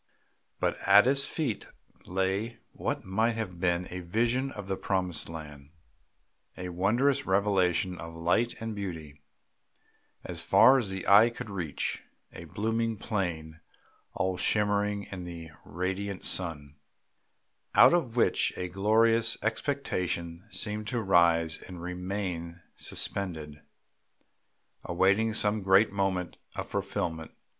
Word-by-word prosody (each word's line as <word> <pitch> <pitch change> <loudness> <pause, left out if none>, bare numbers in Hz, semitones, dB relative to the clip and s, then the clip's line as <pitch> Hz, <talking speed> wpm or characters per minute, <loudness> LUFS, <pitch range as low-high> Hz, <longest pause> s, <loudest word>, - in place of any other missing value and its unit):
But - - 0
at 100 +2 +8
his 140 +1 +3
feet 145 -10 -3 0.4
lay 95 +5 -1
what - - -3
might 110 +5 +1
have 95 -6 -5
been 90 0 +1
a 90 - -4
vision 120 +9 0
of 105 -5 -8
the 95 - -1
promised 95 -4 -2
land, 75 -3 -9 0.9
a 90 0 -5
wondrous 120 +11 +1
revelation 95 -2 +1
of 80 0 -8
light 90 +8 +1
and 115 0 -4
beauty 80 -8 -7 1.0
as - - -1
far 130 +4 +6
as 110 -6 -2
the 95 -1 -5
eye 105 +4 +7
could 115 -3 -8
reach, 85 -7 -3 0.3
a 85 - -9
blooming 115 +5 -1
plain 85 -7 -3 0.6
all 95 -1 -1
shimmering 105 0 +1
in 95 -2 -7
the 85 -2 -8
radiant 95 +4 -4
sun, 75 -5 -1 1.0
out - - +8
of 130 -10 0
which 120 - +2
a 90 -1 -3
glorious 115 +4 +3
expectation 90 - -2
seemed 105 -1 -2
to 120 +3 -1
rise 85 -5 +3
and 90 -2 -9
remain 90 -1 -4 0.2
suspended, 80 -7 -4 1.2
awaiting 100 +5 +2
some 105 0 +2
great 95 +3 +4
moment 95 -3 -1 0.2
of - - -4
fulfilment. 80 -2 -3
95 Hz, 120 wpm, -29 LUFS, 85-110 Hz, 1.2 s, at